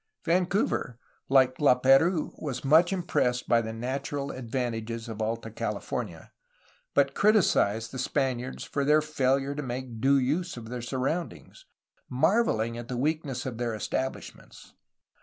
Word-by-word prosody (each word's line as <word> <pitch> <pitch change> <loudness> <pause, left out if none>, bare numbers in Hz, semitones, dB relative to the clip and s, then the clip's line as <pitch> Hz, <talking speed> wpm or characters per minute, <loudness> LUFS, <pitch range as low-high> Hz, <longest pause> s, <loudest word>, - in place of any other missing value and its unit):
Vancouver, 180 - 0 0.3
like 130 -1 +4
Lap^rouse, 140 +5 +4
was 135 -4 -4
much 160 +6 +5
impressed 150 -10 0
by 115 -1 +4
the 110 0 -5
natural 135 +4 -3
advantages 115 -2 -4
of 110 -1 -6
Alta 115 +1 -3
California, - - -4 0.6
but - - +3
criticized 115 - +3
the 130 - -6
Spaniards 130 0 -2
for 140 - -2
their 150 +2 +4
failure 135 -2 0
to 150 - -4
make 125 -3 -6
due 140 +2 +4
use 150 +5 -1
of 115 -1 -8
their 125 0 -5
sur 120 +3 -4
roundings, 165 - -4 0.4
marvelling 125 - +1
at 120 - -8
the 125 - -4
weakness 145 -2 -1
of 120 -3 -5
their 120 -2 -1
establish 130 +4 -3
ments. - - -17
130 Hz, 140 wpm, -28 LUFS, 120-150 Hz, 0.6 s, much